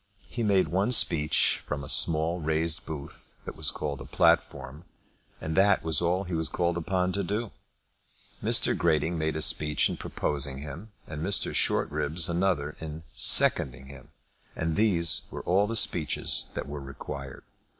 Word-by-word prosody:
He 120 - -6
made 100 -4 +1
one 95 +6 -1
speech 75 -9 +4
from 70 -1 -6
a - - -9
small 80 +3 +4
raised 80 +1 -2
booth 75 -3 -9
that - - -8
was - - +3
called 70 -3 -5
a - - -9
platform, 70 +6 -1 0.6
and 80 0 -5
that 95 +1 +3
was 80 -2 0
all 90 +2 -1
that 90 - -11
he - - -5
was 80 -1 -2
called 85 -1 -2
upon 90 +2 -2
to 100 +2 -3
do. 105 +4 -4 0.9
Mr. - - +2
Grating 80 +1 0
made 80 0 -2
a 80 - +1
speech 75 0 +2
in - - -5
proposing 70 -2 -3
him, 75 +10 -9
and 75 -1 -8
Mr. 95 +4 0
Shortribs 80 +4 +1
another 85 -4 -2
in 80 0 -8
seconding 65 0 +3
him; 70 -1 -13 0.5
and 80 -1 -3
these 90 -7 +2
were - - -8
all 95 +4 +1
the 115 - -4
speeches 80 -7 +2
that - - -5
were 75 0 -7
required. 70 0 -9
80 Hz, 165 wpm, -26 LUFS, 75-90 Hz, 0.9 s, speech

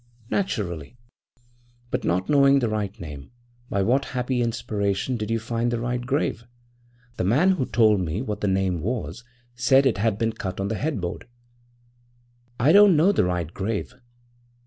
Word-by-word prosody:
'Naturally.' 105 - -2 0.9
'But - - -1
not 90 +2 0
knowing 140 -1 +5
the 120 -4 +1
right 105 -2 -3
name, 75 -4 -9 0.4
by 100 - 0
what 130 +7 +2
happy 125 0 0
inspiration 105 0 -1
did 110 -2 -4
you 115 - +1
find 115 +1 -2
the 120 -1 -1
right 125 +1 -2
grave? 130 -3 -1 0.7
The - - -1
man 140 - +3
who 145 -9 -1
told 110 -4 +3
me 90 +6 -2
what 105 -5 -4
the 105 - 0
name 95 -3 0
was 125 +4 -4 0.3
said 130 +3 +3
it 120 -7 +1
had 110 -1 +1
been 115 0 0
cut 95 -3 -5
on 100 +1 -1
the 110 - -1
headboard.' 105 - -3 1.3
'I 135 +6 +4
don't 200 -1 +7
know 165 +6 +4
the 195 - +2
right 90 -2 -2
grave.' 105 +4 -3
115 Hz, 165 wpm, -24 LUFS, 95-130 Hz, 1.3 s, don't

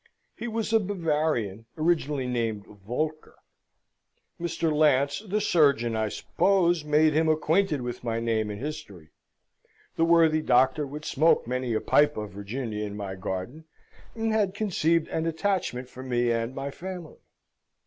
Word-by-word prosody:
He 240 - -5
was 225 -1 -2
a 225 - +6
Bavarian, 155 - -1
originally 155 -4 0
named 115 -4 -2
Voelker. 125 +10 -5 1.0
Mr. 170 -2 -1
Lance, 145 -2 +3
the 210 0 -2
surgeon, 140 - +3
I 110 -1 0
suppose, 175 - +1
made 150 +1 +3
him 160 +1 +2
acquainted 155 0 +2
with 120 0 -5
my 115 -1 -1
name 110 -2 0
and 105 0 -5
history. 100 - -7 0.9
The 165 - +3
worthy 165 -2 +4
doctor 130 +2 +3
would 150 +2 -8
smoke 160 +4 +3
many 125 -1 -2
a 110 - 0
pipe 150 0 +3
of 105 -2 -5
Virginia 105 +2 -4
in 105 -1 -5
my 100 -2 -5
garden, 95 +10 -5 0.5
and 225 -1 -1
had 205 -3 +1
conceived 170 -6 +1
an 160 +1 -1
attachment 165 -7 -1
for 130 - -11
me 120 -2 0
and 115 +2 -2
my 135 +1 -4
family. 180 0 -8
150 Hz, 150 wpm, -27 LUFS, 115-165 Hz, 1.0 s, a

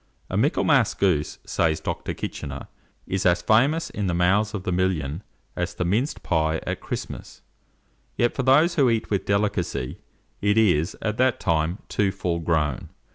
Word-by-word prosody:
"A - - -2
Michaelmas - - +3
goose," 85 -7 +1
says 80 -1 +1
Dr. - - -4
Kitchener, 70 -1 -6 0.4
"is 95 0 -2
as 90 -1 +3
famous 140 - +3
in 105 -2 -2
the 90 - 0
mouths 100 +5 +2
of 95 - -4
the 90 - -2
million 90 -4 -1 0.3
as 85 0 -3
the 90 - -2
minced 115 - -1
pie 80 0 +1
at - - -3
Christmas; - - -7 0.7
yet 120 - +1
for - - -1
those 145 +7 +4
who 140 -6 +3
eat 115 -2 -1
with 100 - 0
delicacy, 100 -10 -1 0.4
it 105 +1 +2
is, 90 -7 +2
at 110 0 -1
that 130 -1 +2
time, 85 +1 0
too 100 -2 +1
full 90 -3 -2
grown. 75 -5 -1
95 Hz, 165 wpm, -24 LUFS, 85-110 Hz, 0.7 s, those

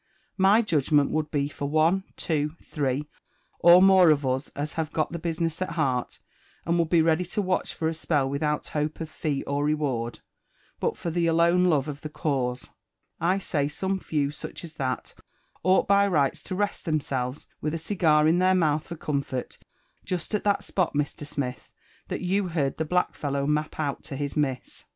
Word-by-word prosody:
My 200 +5 +5
judgment 150 - +2
would 155 -1 -1
be 145 -2 0
for 145 -1 -5
one, 165 +5 +2
two, 150 -1 -1
three, 145 0 -2 0.5
or 175 +2 +8
more 190 -3 +7
of 145 -2 +3
us 130 +2 -1
as 145 +2 -3
hoive 160 -1 -3
got 155 - -1
the 170 - -4
business 165 0 -2
at 185 -3 -2
heart, 135 -7 -1 0.5
and 170 +1 +1
would 165 -2 +1
be 165 -2 +4
ready 160 +2 +2
to 180 +5 -4
watch 185 -1 -1
for 160 - -1
a 165 - 0
spell 150 -3 0
without 150 +2 -1
hope 150 0 -2
of 160 -1 -5
fee 145 -4 -2
or 140 +1 -1
reward, 140 -6 -1 0.6
but - - -1
for 170 - -3
the 170 0 +1
alone 170 +2 +4
love 150 -5 +2
of 145 -1 -6
the 155 - -6
cause; 130 -5 -2 0.3
— - - -39
I' 180 +4 +2
say 150 -7 -1
some 190 +5 -2
few 145 -5 -1
such 150 - -8
as 165 -2 -9
that 130 -5 -3 0.5
ought 185 +1 +3
by 200 0 +5
rights 145 -8 +1
to 185 - -4
rest 205 +1 -1
themselves, 140 -5 -2 0.2
with 155 +1 -1
a - - -1
cigar 160 -3 +3
in 165 +2 +4
their 185 +1 +4
mouth 155 -3 +1
for 170 - -6
comfort, 140 -5 -3 0.4
jest 180 +2 -4
at 210 - 0
that 200 -1 +2
spot, 180 -6 -1
Mr. 145 0 -2
Smith, 125 -6 -4 0.4
that - - -4
you 190 +2 0
heard 150 -6 -1
the 160 - -1
black 180 +3 +1
follow 140 -1 -2
map 150 +1 -1
out 145 -3 -2
to 145 - -6
his 145 0 -3
miss. 135 -4 -2
155 Hz, 195 wpm, -26 LUFS, 145-175 Hz, 0.6 s, or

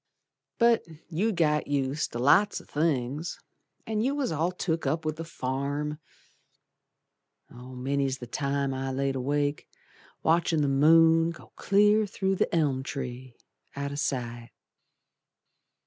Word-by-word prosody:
But 235 -1 +4 0.3
you'd 195 +6 0
got 150 -3 +1
used 140 +1 -1
ter - - -5
lots 145 - +4
o' - - -15
things, 150 0 -1 0.5
An' 215 -1 -1
you 270 +5 0
was 280 -8 -1
all 160 +3 0
took 165 -4 -2
up 155 +3 -1
with 155 0 -2
the 165 - -4
farm. 145 0 -3 1.5
Many's 130 +2 -3
the 125 - -8
time 140 +2 -1
I've 135 0 -3
laid 135 0 0
awake 145 +2 -1 0.6
Watchin' 165 -1 +2
the - - +2
moon 165 +4 +5
go 170 - -11
clear 210 +1 +3
through 195 -1 -1
the - - 0
elm 145 -5 +1
tree, 130 -2 -6 0.4
Out 140 0 -3
o' - - -5
sight. 120 -4 -3
145 Hz, 130 wpm, -28 LUFS, 135-165 Hz, 1.5 s, moon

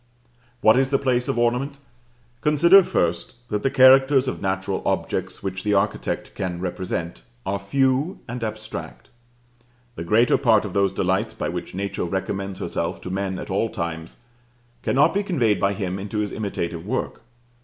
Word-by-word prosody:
What 110 +3 +6
is 135 0 +2
the 135 - +3
place 125 -2 0
of - - -1
ornament? 125 +4 0 0.6
Consider 170 +6 +6
first 85 - -1
that 105 -1 -1
the 135 - +1
characters 135 +1 +6
of 130 - -3
natural 95 0 -2
objects - - -2
which 95 -1 -3
the 105 0 +1
architect 100 +2 -1
can 90 -2 -4
represent 90 -5 -4 0.2
are 100 0 -1
few 135 - +1
and 120 0 -5
abstract. 110 +2 -6 0.8
The 85 - -6
greater 110 +8 +3
part 110 -5 +4
of 100 - -6
those 100 -1 +2
delights - - -1
by - - -3
which - - -6
Nature 100 -1 -3
recommends 95 +1 -3
herself - - -3
to 90 - -6
man 95 -1 -2
at - - -7
all 105 +4 +1
times, 85 -6 -5 0.6
cannot 135 +3 +3
be 200 - +1
conveyed 130 - +1
by 100 0 +2
him 95 -1 -3
into 105 +2 -5
his 105 -2 -1
imitative 85 -6 -4
work. 120 +7 -3
105 Hz, 165 wpm, -23 LUFS, 95-130 Hz, 0.8 s, What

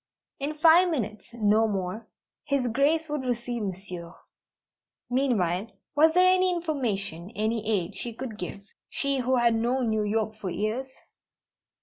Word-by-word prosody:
In 290 +2 -2
five 330 +3 +6
minutes 215 - -3
no 220 -1 +3
more! 200 +2 -3 0.4
His 280 -3 +1
Grace 285 +7 +2
would 300 -2 -2
receive 240 -1 -2
Monsieur. 180 -3 -6 1.0
Meanwhile, 220 -8 +1 0.3
was 315 +2 +5
there 365 0 +6
any 370 0 +4
information, 225 - -2
any 220 0 -1
aid, 195 -3 0
she 240 - -2
could 230 -2 -7
give 180 +2 -5 0.3
she 280 -1 0
who 255 +1 +1
had 240 -1 +4
known 240 +1 +1
New 215 -1 +1
York 215 +1 0
for 215 -3 -5
years? 220 +8 -2
235 Hz, 140 wpm, -27 LUFS, 210-275 Hz, 1.0 s, five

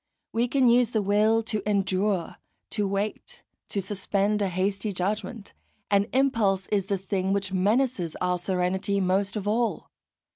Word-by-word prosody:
We 235 +2 +1
can 260 0 +3
use 240 -1 +5
the 220 -3 0
will 215 +3 +3
to 215 -2 -2
endure, 195 -2 0 0.3
to 210 -2 0
wait, 200 +2 -4 0.3
to 200 - -2
suspend 200 +1 -1
a 200 - +2
hasty 195 +3 -1
judgment; 200 +3 -3 0.4
and 200 0 +3
impulse 225 -8 +2
is 200 -2 0
the 200 - 0
thing 190 0 -1
which 195 -1 -2
menaces 200 - +1
our 180 0 0
serenity 185 +2 0
most 195 +2 +1
of 205 -1 -3
all. 230 +2 -1
200 Hz, 150 wpm, -26 LUFS, 190-215 Hz, 0.4 s, use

